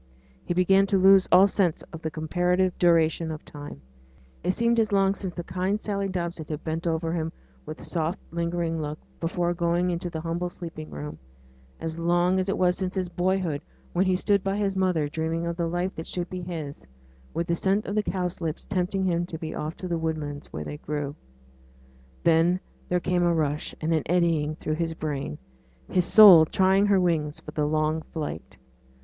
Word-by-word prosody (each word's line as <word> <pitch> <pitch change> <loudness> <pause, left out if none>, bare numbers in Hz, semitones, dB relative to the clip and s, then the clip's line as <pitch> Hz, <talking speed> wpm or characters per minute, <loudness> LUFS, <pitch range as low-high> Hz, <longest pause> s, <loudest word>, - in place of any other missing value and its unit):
He 175 - -2
began 195 +2 +4
to 195 - +2
lose 190 0 +6
all 185 +2 +8
sense 185 -5 0
of 160 - -7
the 160 - -2
comparative 180 +4 0
duration 165 -1 +3
of 155 -1 -6
time: 145 - -9 0.6
it 175 - -1
seemed 235 +4 +2
as 220 -2 +2
long 195 -1 +3
since 190 -3 -6
kind 185 +3 -1
Sally 200 -2 -2
Dobson 170 -4 -4
had 155 0 -4
bent 165 +1 -3
over 165 0 0
him 160 -1 -2 0.4
with 155 +1 -7
soft, 165 +1 -1
lingering 170 -1 -1
look, 150 0 -4 0.2
before 175 +1 0
going 175 +1 +1
into 175 +1 -3
the 160 -2 -5
humble 170 +2 -2
sleeping 165 -3 -8
room 75 +1 -7 0.6
as 165 0 -4
long 175 +2 +2
as 185 +1 -1
it - - 0
was 180 -1 +3
since 185 0 -3
his 185 -2 -1
boyhood, 180 -4 0 0.3
when 185 +2 +2
he 185 - +3
stood 200 +1 +2
by 195 +1 -1
his 200 -2 0
mother 180 -5 +1
dreaming 160 +2 -2
of 170 0 -2
the 170 -1 -1
life 175 +3 -1
that 160 - -6
should 175 -1 -4
be 185 0 -4
his, 160 -5 -6 0.4
with 170 - -2
the 170 - 0
scent 195 +4 +1
of 200 - -3
the 215 - +2
cowslips 180 -5 -3
tempting 190 0 -1
him 175 -2 +1
to 165 - -6
be 160 0 -5
off 155 +2 -4
to 185 - -5
the 170 -2 -1
woodlands 155 -3 -4
where 75 - -5
they 75 -1 -6
grew. 145 - -4 1.1
Then 170 +2 +4 0.3
there 180 - +2
came 180 0 0
a 175 -1 +3
rush 150 -1 -1
and 160 +1 0
an 160 - +2
eddying 165 -3 +1
through 155 0 -3
his 165 -1 -1
brain 150 -1 -4 0.5
his 180 -2 +2
soul 190 -7 +9
trying 190 +4 +3
her 200 -2 +4
wings 160 -4 0
for - - -10
the 150 -1 0
long 155 +1 +1
flight. 150 - -6
170 Hz, 195 wpm, -26 LUFS, 160-185 Hz, 1.1 s, soul